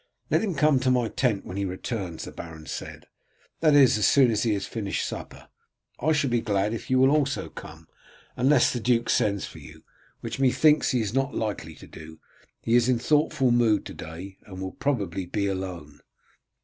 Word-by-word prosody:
"Let - - +3
him 200 -6 -2
come 150 -2 +3
to 130 0 0
my 125 -3 +2
tent 120 -7 0
when 95 - -7
he 100 - -1
returns," 95 -2 -5
the - - -7
baron 80 -2 -10
said; - - -7 0.5
"that 155 -3 +4
is 130 -6 +6
as 105 - +4
soon 130 -4 +5
as 110 - 0
he 110 -3 +1
has 100 - -3
finished 105 -4 -3
supper. - - -8 0.5
I 155 +5 +1
shall 145 -4 +1
be 120 -1 +2
glad 105 -1 0
if 115 - -6
you 130 - +3
will 130 +1 +5
also 145 -2 0
come, - - -11 0.5
unless 130 +1 +3
the 125 - -2
duke 120 0 +1
sends 100 -2 +1
for - - -11
you, - - -14 0.4
which - - -5
methinks 150 +3 +4
he 125 - +1
is 105 -1 -3
not 135 +1 -1
likely 100 -7 -4
to - - -13
do. 80 0 -12 0.4
He 115 - 0
is 120 +1 +4
in 125 - +3
thoughtful 145 0 +2
mood 115 -4 +2
to - - -8
day, 85 +5 -9
and 95 -2 -9
will 95 0 -4
probably 100 -10 -2
be 100 +2 -1
alone." 90 -6 -5
115 Hz, 200 wpm, -26 LUFS, 95-135 Hz, 0.5 s, is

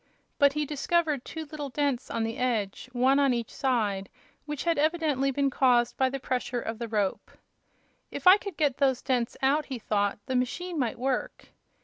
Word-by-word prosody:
But 285 -2 +5
he 300 0 -1
discovered 300 -1 0
two 320 -1 -6
little 295 -1 -6
dents 275 -2 -1
on 230 - -1
the 225 0 -3
edge, 235 -2 -1
one 260 +3 +3
on 275 -3 +3
each 235 -2 -4
side, 210 -8 0 0.4
which 295 -2 -4
had 335 -3 +1
evidently 305 -3 +1
been 275 0 0
caused 245 -2 +3
by 260 -1 +2
the 275 +1 -4
pressure 250 -1 -2
of 225 -1 -5
the 235 - -3
rope. 210 -3 -1 0.8
"If - - -7
I 370 +2 +9
could 400 -5 -8
get 290 -5 +1
those 265 -3 +1
dents 250 -3 -1
out," 290 +3 +3
he 265 - -4
thought, 205 -3 0
"the 260 - -2
machine 325 +7 -2
might 240 -4 -1
work." 260 +1 -3
265 Hz, 190 wpm, -28 LUFS, 240-295 Hz, 0.8 s, I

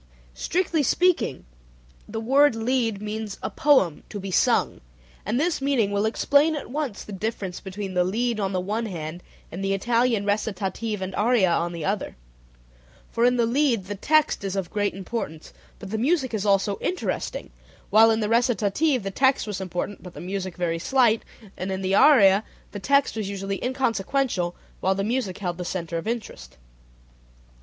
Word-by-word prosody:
Strictly 335 - 0
speaking 335 - +1 0.6
the 220 +1 -4
word 270 +3 +4
lied 225 -3 0
means 210 -1 -4
"a - - -3
poem 260 - +3
to 205 - -6
be 195 0 -6
sung," - - +2 0.5
and 225 +5 +1
this 325 -1 0
meaning 265 -7 +1
will 205 +2 +1
explain 285 +7 +3
at 290 - -6
once 280 -7 -3
the - - -11
difference 195 -2 -4
between 195 0 -6
the 180 -1 +3
lied 225 +5 -1
on 195 -2 -1
the 185 - 0
one 215 +5 -2
hand, 170 -2 -6 0.3
and 180 +4 -5
the 195 0 +1
Italian 230 0 +1
recitative 205 0 -2
and 185 0 -5
aria 210 -4 +3
on 170 +1 0
the 170 -3 -5
other, 200 +1 -2 1.0
for 235 - +2
in 250 0 +3
the 235 - +3
lied 240 -4 +1
the 205 - -4
text 305 +5 +2
is 195 -1 -3
of 190 -3 -3
great 205 -2 -1
importance, 190 -5 -6 0.2
but 195 -2 -9
the 220 - -1
music 265 -1 +1
is 210 -1 -1
also 195 0 +2
interesting, 435 +6 -3 0.4
while 220 +1 +7
in 225 0 +2
the 210 - 0
recitative 240 +3 +1
the 195 - -3
text 265 +6 +2
was 205 -3 -4
important 185 +2 -4
but 180 -2 -11
the - - -8
music 185 0 -4
very 165 -2 -1
slight, 235 +2 +3 0.3
and 185 +1 -4
in 190 0 -3
the 190 +1 0
aria 205 -5 +6 0.3
the 205 - -6
text 280 +6 +2
was 215 -3 -3
usually 195 0 -4
inconsequential 245 -6 0 0.2
while 190 +1 +1
the 195 - -1
music 220 -4 -1
held 180 -3 -4
the - - -2
center 170 -1 -3
of 165 - -8
interest. 135 - -5
210 Hz, 180 wpm, -24 LUFS, 190-245 Hz, 1.0 s, while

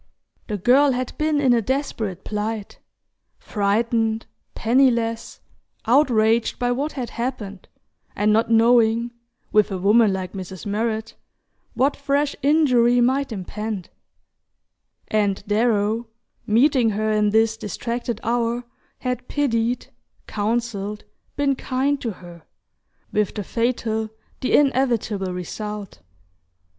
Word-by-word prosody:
The 210 - -2
girl 260 +7 +4
had 255 0 -3
been 305 -1 +2
in 260 -4 +4
a 235 - +3
desperate 225 -7 -3
plight 210 0 -4 0.6
frightened, 220 +2 0 0.3
penniless, 235 -2 +1 0.4
outraged 230 -3 +3
by 245 0 0
what 280 +5 -2
had 250 -4 -5
happened, 230 -6 -5 0.5
and 210 +1 +2
not 225 +1 +2
knowing 230 0 +4 0.4
(with 210 -1 +4
a 190 - -2
woman 210 +3 +4
like 185 -1 -4
Mrs. 190 -2 -7
Murrett) 220 +2 -2 0.6
what 275 +3 +2
fresh 280 +1 0
injury 255 -5 +4
might 265 +2 +2
impend; 210 -1 -5 1.2
and 205 -2 0
Darrow, 220 +1 +1 0.4
meeting 245 +2 +4
her 215 +1 -1
in 210 -1 +2
this 220 +1 +3
distracted 235 +2 -4
hour, 235 +1 0 0.4
had 250 -1 -3
pitied, 240 -4 0 0.4
counselled, 210 -1 -2 0.3
been 285 -1 +2
kind 270 +2 -1
to 235 - -2
her, 175 -2 -13 0.7
with 210 -2 0
the 210 - -3
fatal, 230 -1 -1 0.3
the 255 - -1
inevitable 235 -8 +1
result. 205 +3 -6
230 Hz, 110 wpm, -22 LUFS, 210-250 Hz, 1.2 s, girl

